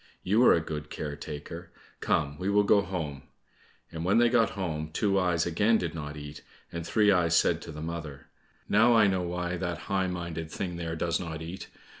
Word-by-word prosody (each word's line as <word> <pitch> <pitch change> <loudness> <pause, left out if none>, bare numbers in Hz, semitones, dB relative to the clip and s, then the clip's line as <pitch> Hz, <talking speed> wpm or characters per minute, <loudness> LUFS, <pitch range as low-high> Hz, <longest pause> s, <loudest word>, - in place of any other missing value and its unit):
You 105 +6 +3
are - - +8
a 85 - +1
good 75 -1 -6
care 75 -2 -5
taker! 80 +4 -8 0.3
Come, 70 +1 0
we 95 +2 -1
will 105 0 +4
go 100 0 +5
home." 80 -8 -4 0.7
And 80 0 -5
when 95 +5 +3
they 120 0 +5
got 115 -2 +3
home, 80 -5 -3
Two 100 +4 +1
eyes 90 -3 +1
again 105 +7 +3
did 85 -5 -3
not 75 -2 -6
eat, 75 +1 -8 0.3
and 85 0 -4
Three 105 +4 +3
eyes 85 -3 +3
said 85 -1 +2
to 85 - -8
the 75 0 -7
mother, 80 -5 -6 0.4
"Now, 115 +3 +5
I 110 -2 +6
know 95 -2 +2
why 90 0 -3
that 85 -2 -3 0.2
high 95 -1 +2
minded 85 -3 -4
thing 90 0 -4
there 85 -1 -3
does 85 +1 0
not 80 -2 -5
eat. 85 +4 -7
85 Hz, 205 wpm, -28 LUFS, 80-95 Hz, 0.7 s, are